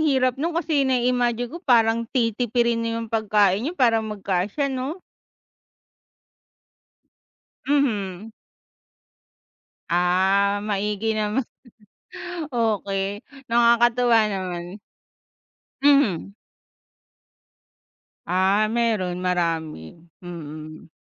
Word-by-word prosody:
hirap 265 -4 +1
nun, 330 +2 -1
kasi 315 -4 +1
nai-imagine 245 -1 +1
ko 340 - -7
parang 230 -5 +2
titipirin 235 -1 0
niyo 230 0 -2
yung 225 - -14
pagkain 210 -3 +2
niyo 355 - -7
para 230 -5 +3
magkasya, 210 +5 -2
'no? 270 +8 -4 2.7
Mhm. 220 -8 -1 1.6
Ah, 190 +3 +2
maigi 210 +2 -1
naman. 215 +4 0 1.1
Okey, 200 -3 -1 0.3
nakakatuwa 235 0 +4
naman. 180 0 -5 1.0
Mhm. 275 - +3 1.9
Ah, 190 +4 +2
meron 215 -6 -1
marami, 165 - -2 0.3
mm. 155 -2 -9
220 Hz, 75 wpm, -23 LUFS, 190-245 Hz, 2.7 s, nakakatuwa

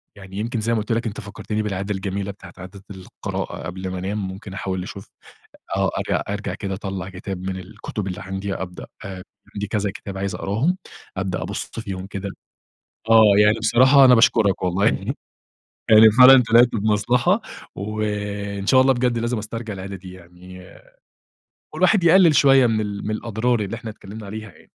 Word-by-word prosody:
يعني 95 -1 -11
يمكن 115 +2 -2
زي 115 +2 0
ما 110 - +1
قُلت 110 +3 -5
لك، 115 0 0
أنتَ 105 - -6
فكّرتني 105 +1 -4
بالعادة 100 0 -3
الجميلة 100 +1 -4
بتاعة 100 - -14
عادة 95 +2 -11
القراءة 95 -1 -6
قبل 95 +1 -5
ما 90 0 -5
أنام 100 +1 -3
ممكن 95 +1 -9
أحاول 95 -2 -3
أشوف 95 +1 -9 0.7
آه - - +1
أرجع - - -1
أرجع 100 +1 -3
كده 95 -2 -5
أطلَّع 95 -1 -5
كتاب 95 0 -6
من 95 0 -3
الكتب 95 +2 -7
اللي 90 - -5
عندي 95 +1 -4
أبدأ 90 -2 -7 0.7
عندي 105 0 -3
كذا 105 -2 -1
كتاب 95 -1 -8
عايز 100 0 -3
أقراهم، 135 - -1 0.4
أبدأ 95 -1 -2
أبُص - - -5
فيهم 95 -3 -6
كده. 100 0 -5 0.8
آه، 115 0 +8 0.2
يعني 105 +2 +4
بصراحة 130 +5 +5
أنا 125 -1 +7
باشكرك 110 -5 +3
والله 90 +3 0
يعني - - -1 0.7
يعني 110 0 +8
فعلًا 130 +2 +8
طلِعت 120 +1 +7
بمصلحة 120 - +1 0.3
وإن 105 -1 -4
شاء 130 +2 +5
الله 135 +1 +5
بجد 120 -1 0
لازم 115 0 -1
أسترجع 110 +1 -6
العادة 95 +1 -7
دي 90 0 -11
يعني، 90 +1 -14 1.1
والواحد 200 -5 +3
يقلِّل 170 -2 +6
شوية 135 -2 +6
من 110 -1 0
ال 100 -1 -5
من - - -1
الأضرار، 115 +1 -1
اللي 100 +3 -4
إحنا 115 -1 -7
اتكلمنا 105 +1 -10
عليها 110 +1 -8
يعني. - - -22
105 Hz, 170 wpm, -22 LUFS, 95-115 Hz, 1.1 s, آه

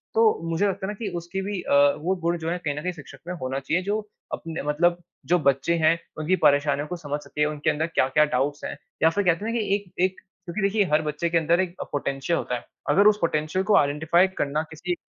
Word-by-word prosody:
तो 225 - +4 0.3
मुझे 165 +5 +1
लगता 190 0 -2
है 205 - -3
ना - - -5
कि 220 - -3
उसके 175 +3 -4
भी 200 -3 -3
अ, - - -2 0.2
वो 180 +5 -1
गुण 170 +1 0
जो 160 0 -4
हैं, 175 +1 -2
कहीं 145 -4 -2
न - - -3
कहीं 180 - -2
शिक्षक 145 -3 -12
में 180 - -3
होना 130 +1 -2
चाहिए 165 +7 -1
जो 205 +3 0 0.3
अपने 165 -1 -4
मतलब 175 +4 +2 0.3
जो 180 - +3
बच्चे 140 +3 +2
हैं, 165 +1 +3 0.2
उनकी 160 +5 +1
परेशानियों 145 0 +3
को 180 - -4
समझ 145 -3 -4
सके, 150 0 -1
उनके 150 0 -1
अंदर 155 +2 0
क्या-क्या 150 -1 +3
डाउट्स 145 +1 -1
हैं - - -5 0.3
या 160 - +7
फिर 205 +4 0
कहते 180 +3 +1
हैं 230 - -1
ना - - 0
कि 200 -2 +1
एक 200 -3 -6
एक 190 0 +2 0.3
क्योंकि 175 +5 -4
देखिए 200 +1 +2
हर 155 +1 +4
बच्चे 155 +2 -2
के 170 - +2
अंदर 170 +2 +2
एक 185 -2 -1
अ, - - -1
पोटेंशियल 140 +3 -1
होता 125 - -2
है। 120 - -7 0.2
अगर 200 +8 +5
उस 210 0 +5
पोटेंशियल 160 +3 0
को 210 - +4
आइडेंटिफाई 160 +6 +3
करना 150 +2 0
किसी 175 +3 -3
अ, - - -3
165 Hz, 250 wpm, -25 LUFS, 150-185 Hz, 0.3 s, या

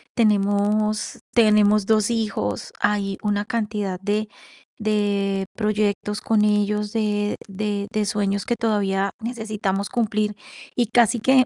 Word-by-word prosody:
Tenemos 210 -1 +1
tenemos 210 -2 +4
2 215 0 +3
hijos, 205 - -2
hay 200 -2 0
una 205 -1 0
cantidad 210 -5 -2
de 210 +2 -1 0.5
de 200 -2 0
proyectos 210 -1 -1
con 215 -2 +2
ellos, 210 0 +1
de 210 -2 0
de 205 0 -3
de 215 -1 0
sueños 200 0 -1
que 240 - 0
todavía 200 -4 0
necesitamos 215 -4 -2
cumplir, 215 -2 0 0.4
y 240 -2 +2
casi 235 0 +4
que 260 +2 +5
210 Hz, 120 wpm, -23 LUFS, 200-215 Hz, 0.5 s, que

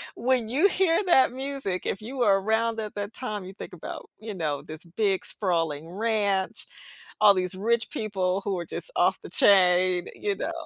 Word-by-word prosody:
When 245 -2 0
you 300 +11 +4
hear 370 0 +2
that 265 -8 +5
music, 265 -8 -4
if 190 - -2
you 255 +5 -7
were 200 -5 +3
around 225 +2 0
at 215 -1 -5
that 205 +1 -4
time, 210 -6 -5
you 190 - -9
think 185 - -9
about, 170 - -8
you 215 -1 -6
know, 150 -6 -2
this 155 +3 -9
big 190 +2 -1
sprawling 165 -5 -1
ranch, 200 -1 0 0.6
all 205 -1 +8
these 185 0 -1
rich 230 +4 0
people 195 -3 -1
who 200 -2 -1
are 170 - -5
just - - -6
off - - +2
the - - -10
chain, 180 -2 +4
you 200 -1 -2
know? 320 - -3
205 Hz, 185 wpm, -26 LUFS, 185-230 Hz, 0.6 s, all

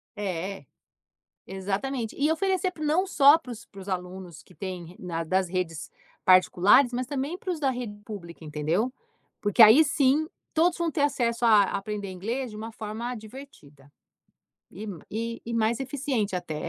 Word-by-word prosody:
É. 190 -4 -4 0.8
Exatamente. 205 +6 -3
E 295 +3 +2
oferecer 375 +2 0
p, 315 - -13
não 310 +5 +2
só 285 -3 +7
para 260 -7 -10
os, 230 0 -9
para 195 -1 -12
os 195 - -9
alunos 180 -2 -6
que 180 - -20
têm, 180 -2 -7
na, 165 -2 -3
das 185 +3 +1
redes 170 -4 -3 0.3
particulares 195 +7 +5
mas, 250 +1 -2
também, 285 +6 -3
para 370 - -4
os 330 - -3
da 275 - +2
rede 245 -4 -5
pública. 170 -6 -9
Entendeu? 160 +11 -1 0.5
Porque, 205 +2 +3
aí, 225 +9 +9
sim, 290 +1 +2 0.3
todos 335 +2 +3
vão 340 -1 0
ter 290 - -1
acesso 240 -5 0
a 215 -3 +7
aprender 200 +1 -3
inglês 225 +7 -4
de 210 - -9
uma 225 +1 -6
forma 220 +3 -5
divertida. 210 - -13 0.8
E, 210 +4 -8 0.6
m 235 - -4
mais 230 +2 +1
eficiente, 260 -7 -2
até. 175 -3 -4
220 Hz, 160 wpm, -27 LUFS, 185-270 Hz, 0.8 s, aí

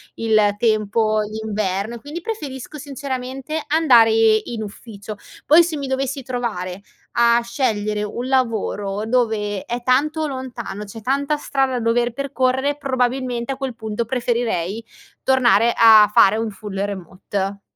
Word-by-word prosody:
il 215 -2 +2
tempo 215 -1 +1
d'inverno 215 0 -3
e - - -9
quindi 300 +6 -7
preferisco 300 - -6
sinceramente 270 +1 -5
andare 260 -8 +5
in 220 0 +2
ufficio. 205 0 -9 0.3
Poi 320 +3 +7
se 335 -1 -3
mi 280 -1 -4
dovessi 270 +1 -2
trovare 205 -7 -4 0.3
a 235 0 +4
scegliere 215 -4 -1
un 240 +4 -4
lavoro 215 -5 -1
dove 220 -4 0
è 240 +1 -4
tanto 300 +5 +1
lontano, 240 -6 -6
c'è 215 +2 -10
tanta 280 +4 0
strada 270 -2 0
da 250 - -1
dover 240 +1 +1
percorrere, 275 +1 0
probabilmente 255 -2 -1
a - - -9
quel 270 -3 -4
punto 220 0 -3
preferirei 230 -4 -2 0.4
tornare 240 -3 +4
a 220 -2 +8
fare 210 +2 +6
un 225 -1 -2
full 200 -1 -7
remote. 195 +1 -4
235 Hz, 135 wpm, -20 LUFS, 215-265 Hz, 0.4 s, a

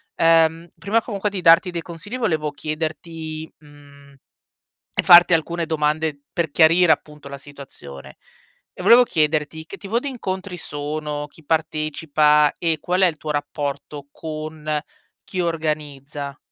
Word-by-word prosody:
Ehm, 165 0 +3
prima 220 +4 0
comunque 210 -2 -3
di 195 - -4
darti 165 +3 +5
dei 170 -1 -3
consigli 180 +9 -8
volevo 155 -9 0
chiederti 155 +1 -5
mhmm, 145 -1 -18 0.8
e - - +1
farti 175 -1 +8
alcune 170 +1 -1
domande 155 -1 -1
per 165 -3 -1
chiarire 165 +2 +5
appunto 150 -1 -4
la 140 - -8
situazione. 100 - -12 0.6
E - - -9
volevo 245 +2 +7
chiederti 155 -3 -1
che 195 - -9
tipo 210 +4 -2
di 285 - -4
incontri 190 -7 -5
sono, 150 -1 -5
chi 160 - -19
partecipa 155 -1 +2
e 165 -2 0
qual 180 +4 0
è 185 - +7
il 165 - -1
tuo 155 0 -6
rapporto 145 -1 -5
con 155 -1 -4 0.4
chi 185 - -4
organizza? 150 -4 -3
155 Hz, 140 wpm, -21 LUFS, 150-170 Hz, 0.8 s, farti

